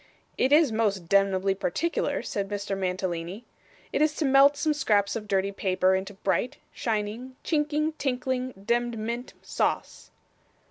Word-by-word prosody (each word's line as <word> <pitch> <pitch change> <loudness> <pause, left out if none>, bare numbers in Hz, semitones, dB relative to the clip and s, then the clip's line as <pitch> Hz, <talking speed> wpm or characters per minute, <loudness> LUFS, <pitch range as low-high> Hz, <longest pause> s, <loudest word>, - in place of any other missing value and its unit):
'It 260 - +1
is 300 -3 +6
most 205 -6 0
demnebly 195 0 +3
particular,' 200 - -1
said 195 -1 -3
Mr. 200 -1 -3
Mantalini. 185 +2 -3 0.5
'It - - +1
is 305 0 +3
to 315 - -1
melt 275 +1 +6
some 305 +1 +1
scraps 205 -9 +1
of 215 -2 -5
dirty 195 0 +1
paper 185 -1 +1
into 190 +1 -2
bright, 235 +8 -1 0.2
shining, 225 +3 -3
chinking, 300 0 +1
tinkling, 255 -1 -1
demd 235 +4 -1
mint 235 +3 -4
sauce. - - -2
215 Hz, 140 wpm, -27 LUFS, 195-260 Hz, 0.5 s, is